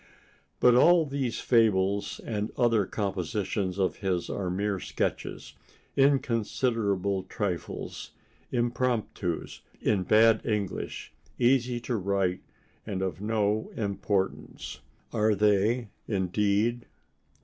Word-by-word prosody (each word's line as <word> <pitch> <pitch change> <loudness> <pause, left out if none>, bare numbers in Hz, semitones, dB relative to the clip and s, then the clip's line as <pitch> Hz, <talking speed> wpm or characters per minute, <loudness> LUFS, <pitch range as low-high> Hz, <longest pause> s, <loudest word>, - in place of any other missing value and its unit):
But 125 - +6
all 165 +6 +6
these 135 -4 -2
fables 100 -4 +2
and 105 -1 -2
other 115 -5 +3
compositions 95 -1 -2
of 95 -2 0
his 95 -3 -1
are 95 -3 -2
mere 100 +2 -1
sketches, - - -3 0.4
inconsiderable 115 -7 +1
trifles, 95 -5 -4 0.4
impromptus 120 -7 -1 0.2
in 105 -3 +1
bad 110 +3 +5
English, 105 -4 -3 0.2
easy 125 -1 +2
to 120 -1 -2
write 95 -2 0 0.4
and 95 -3 -3
of 95 0 -3
no 105 0 0
importance! 100 -2 -2 0.3
Are 105 0 +3
they, 105 +3 +2 0.2
indeed? 105 +4 0
105 Hz, 95 wpm, -28 LUFS, 95-115 Hz, 0.4 s, But